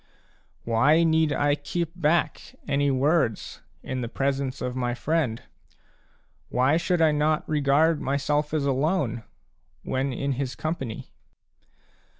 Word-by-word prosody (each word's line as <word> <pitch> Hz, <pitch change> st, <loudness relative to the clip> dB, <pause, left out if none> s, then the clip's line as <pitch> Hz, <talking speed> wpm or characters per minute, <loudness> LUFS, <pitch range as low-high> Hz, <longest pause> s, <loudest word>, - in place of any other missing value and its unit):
Why 140 Hz, +9 st, +3 dB
need 160 Hz, -1 st, +2 dB
I 145 Hz, 0 st, +2 dB
keep 155 Hz, +3 st, -3 dB
back 170 Hz, -1 st, 0 dB
any 145 Hz, -1 st, +1 dB
words 135 Hz, -3 st, 0 dB, 0.2 s
in 130 Hz, 0 st, -4 dB
the 120 Hz, -, -3 dB
presence 135 Hz, 0 st, -2 dB
of 125 Hz, 0 st, -4 dB
my 120 Hz, -1 st, -1 dB
friend? 140 Hz, -4 st, -1 dB, 1.1 s
Why 130 Hz, +4 st, +2 dB
should 170 Hz, -1 st, +1 dB
I 155 Hz, -, +5 dB
not 150 Hz, +1 st, 0 dB
regard 150 Hz, +2 st, +2 dB
myself 145 Hz, +2 st, 0 dB
as 150 Hz, -2 st, 0 dB
alone 135 Hz, -, 0 dB, 0.6 s
when 135 Hz, +1 st, -1 dB
in 140 Hz, +3 st, -2 dB
his 130 Hz, -2 st, -3 dB
company 135 Hz, -8 st, -5 dB
145 Hz, 125 wpm, -25 LUFS, 130-155 Hz, 1.1 s, I